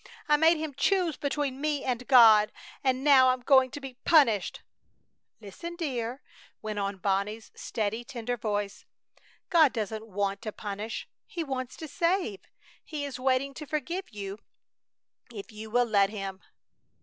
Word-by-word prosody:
I 300 - +5
made 320 +2 +5
him 310 -2 -4
choose 355 +3 +1
between 280 -2 -2
me 295 -2 0
and 250 -1 -2
God! 220 -5 +7 0.3
And 260 -1 +1
now 265 -3 +7
I'm 255 0 0
going 260 0 +5
to 270 - -7
be 270 -3 -9
punished!" 230 - +3 0.8
"Listen, 230 - -8
dear!" 260 -6 -3 0.4
went 215 -1 -4
on 200 0 -2
Bonnie's 200 +3 -2
steady, 220 +1 -3
tender 245 -2 -4
voice. 205 -3 -3 0.6
"God 320 -6 +5
doesn't 220 -1 -4
want 200 -1 -2
to 220 -2 -4
punish. 210 +2 -5 0.2
He 335 - -4
wants 260 -4 -4
to 315 - -7
save. 340 - 0 0.4
He 295 -2 -5
is 275 -2 -6
waiting 260 +1 +1
to 300 +2 -8
forgive 335 +6 -3
you 200 -1 -7 0.9
if 215 0 -9
you 215 +1 -9
will 245 +2 +3
let 200 -3 +3
Him!" 195 -2 -6
250 Hz, 150 wpm, -28 LUFS, 210-285 Hz, 0.9 s, God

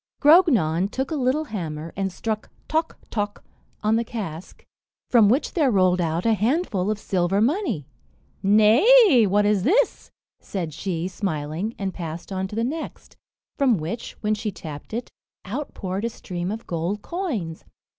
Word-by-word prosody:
Grognon 230 - +5
took 265 +6 -3
a - - 0
little 270 +2 +1
hammer, 165 - -5
and 195 0 -1
struck 215 +3 -4 0.2
"toc, 320 +1 -1
toc," 205 -2 -3 0.4
on 215 +1 +3
the 230 - +1
cask, 195 -8 -7 0.5
from 225 -5 +6
which 260 +7 +1
there 300 -6 +3
rolled 185 -4 +3
out 165 +1 -1
a 225 - +4
handful 215 - 0
of 215 - 0
silver 190 -2 0
money. 240 - 0 0.6
"Nay, 240 - +6
what 205 +2 +3
is 205 -2 +3
this?" 450 - +1 0.3
said 170 -6 -4
she, 170 +1 -3
smiling, 180 +2 -3
and 195 -2 -3
passed 165 +1 -6
on 190 0 -2
to 205 - -8
the 230 - 0
next, 310 +7 -5 0.4
from 260 -6 +4
which, 175 +9 -5
when 215 0 +1
she 215 0 -2
tapped 150 -6 -9
it, 235 +3 -4 0.3
out 255 +10 -5
poured 190 +2 -3
a 235 - 0
stream 180 -5 -5
of 220 +2 -5
gold 175 +5 -3
coins. 250 - -4
210 Hz, 160 wpm, -24 LUFS, 180-245 Hz, 0.6 s, from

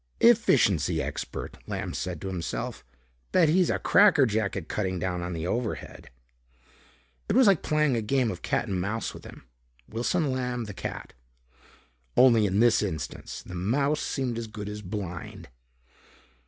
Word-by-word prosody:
"Efficiency 135 - +4
expert," - - -5
Lamb - - -4
said 90 -3 -4
to - - -5
himself. 90 -3 -4 0.5
"Bet 165 -4 +4
he's 180 +2 +3
a - - +1
cracker 200 -9 +5
jack 110 -3 -1
at 90 - -5
cutting 95 -3 -2
down 90 0 -2
on 90 +1 -4
the 80 0 -4
overhead." 115 +4 -4 1.2
It - - +1
was 260 0 +6
like 195 -5 +5
playing 150 -3 +2
a 115 - 0
game 120 +1 +1
of 90 - -8
cat - - -1
and 95 -2 -1
mouse 105 +4 -3
with - - -12
him, - - -12 0.4
Wilson 135 +7 0
Lamb, 125 -2 -2
the 105 - -7
cat. - - -6 1.0
Only 115 -5 +6
in 95 +2 0
this 120 -1 +5
instance, 95 -7 -5
the - - -10
mouse 140 +12 0
seemed 125 -4 -2
as 115 - -5
good 105 -1 -7
as 105 0 -6
blind. 90 - -6
110 Hz, 160 wpm, -27 LUFS, 95-135 Hz, 1.2 s, was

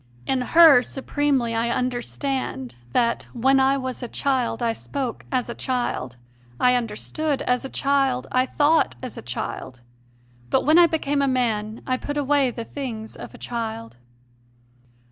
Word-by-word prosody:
In 265 -1 0
her 315 -1 +7
supremely 270 -2 -1
I 230 +1 0
understand 250 - -2 0.2
that 235 - +1
"when 265 +3 +3
I 265 +1 +3
was 260 -1 -4
a 245 - -4
child 255 -3 -1
I 230 -1 +1
spoke 260 0 -5
as 255 -2 0
a 235 - -4
child, 235 - -3 0.4
I 250 0 +4
under 230 -4 -2
stood 305 +3 -2
as 250 +1 +1
a 270 - -5
child, 270 -2 +1
I 255 +1 +2
thought 305 +4 +2
as 255 - -6
a - - -7
child. 125 +1 -6 0.7
But - - +2
when 310 +4 +6
I 345 - +8
became 290 -3 0
a 275 - +2
man, 225 -4 -1
I 255 -1 0
put 290 +3 -5
away 285 -2 +2
the 235 -1 -6
things 225 -6 -6
of - - -10
a - - -11
child." 230 - -5
255 Hz, 165 wpm, -23 LUFS, 235-275 Hz, 0.7 s, I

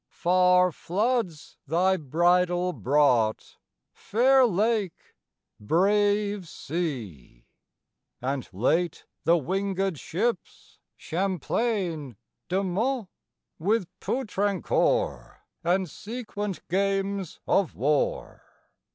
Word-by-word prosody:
Far 180 0 +4
floods 200 - -2
thy 180 +5 +3
bridal 175 +3 +2
brought, 125 -7 +1 0.4
fair 255 +3 +3
lake, 210 -2 -1 0.5
brave 205 - +1
sea! 115 - -5 0.7
And 135 +1 -3
late, 160 - 0 0.2
the 170 - +5
wingëd 190 +1 -1
ships 225 +8 -3 0.2
Champlain, 180 - -2 0.3
De 190 +2 +1
Monts, 220 +4 -1 0.5
With 200 +4 +1
Poutrincourt, 240 - 0 0.3
and 180 +2 +1
sequent 210 - -6
games 195 0 -1
of 195 -5 +1
war. 145 +2 0
185 Hz, 75 wpm, -26 LUFS, 160-205 Hz, 0.7 s, the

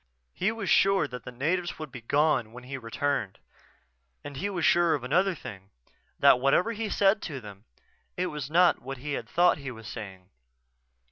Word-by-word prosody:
He 190 +4 0
was 225 -3 -5
sure 195 -4 +4
that 125 -2 -9
the - - -7
natives 170 +8 -1
would 155 -3 -7
be 125 -2 -9
gone 130 -3 +1
when 125 +1 -10
he 135 +2 -6
returned. 125 -3 -2 0.9
And 145 -1 -8
he 200 +8 -2
was 175 -5 -1
sure 175 -1 +4
of 140 - -6
another 180 +8 +2
thing: 95 -9 -10 0.5
That - - +6
whatever 140 - +3
he 225 0 -3
had 210 - -2
said 200 +2 +3
to 140 -5 -5
them, 100 -4 -12 0.5
it 180 - 0
was 145 -2 -5
not 175 +3 +4
what 135 +2 -6
he 145 +3 -5
had - - -4
thought 175 -3 +3
he 140 -1 -6
was 115 -3 -10
saying. 95 -4 -9
145 Hz, 195 wpm, -28 LUFS, 125-180 Hz, 0.9 s, That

